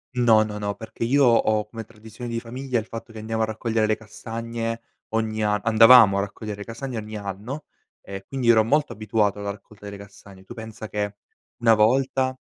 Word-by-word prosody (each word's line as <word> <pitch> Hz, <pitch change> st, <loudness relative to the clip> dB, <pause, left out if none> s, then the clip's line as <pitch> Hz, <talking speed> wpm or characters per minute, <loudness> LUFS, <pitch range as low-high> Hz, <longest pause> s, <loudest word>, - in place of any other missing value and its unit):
No, 115 Hz, -3 st, +5 dB
no, 105 Hz, -1 st, -3 dB
no, 100 Hz, -1 st, -2 dB
perché 110 Hz, +2 st, -7 dB
io 140 Hz, +4 st, +3 dB
ho 110 Hz, -3 st, +3 dB
come 115 Hz, 0 st, -7 dB
tradizione 115 Hz, +2 st, -9 dB
di 115 Hz, -, -1 dB
famiglia 125 Hz, +1 st, -3 dB
il 110 Hz, -, -8 dB
fatto 115 Hz, 0 st, -8 dB
che 110 Hz, -, -8 dB
andiamo 110 Hz, +1 st, -2 dB
a -, -, +3 dB
raccogliere 110 Hz, 0 st, -1 dB
le 110 Hz, -, +2 dB
castagne 115 Hz, +1 st, -5 dB, 0.3 s
ogni 110 Hz, -1 st, -1 dB
an 105 Hz, -1 st, +1 dB
andavamo 115 Hz, -2 st, +7 dB
a 100 Hz, -, +2 dB
raccogliere 100 Hz, +1 st, -6 dB
le 100 Hz, -, -6 dB
castagne 120 Hz, +1 st, -6 dB
ogni 110 Hz, 0 st, -6 dB
anno, 105 Hz, +9 st, -6 dB, 0.4 s
e 95 Hz, 0 st, -8 dB
quindi 130 Hz, -3 st, -1 dB
ero 110 Hz, -2 st, +6 dB
molto 145 Hz, +6 st, +1 dB
abituato 105 Hz, -1 st, 0 dB
alla 100 Hz, 0 st, -3 dB
raccolta 105 Hz, 0 st, -14 dB
delle 100 Hz, 0 st, -7 dB
castagne. 100 Hz, -1 st, -14 dB
Tu 120 Hz, -, -10 dB
pensa 110 Hz, -1 st, -8 dB
che 105 Hz, -1 st, -3 dB, 0.4 s
una 115 Hz, -1 st, +4 dB
volta 130 Hz, +4 st, +2 dB
110 Hz, 195 wpm, -24 LUFS, 105-115 Hz, 0.4 s, andavamo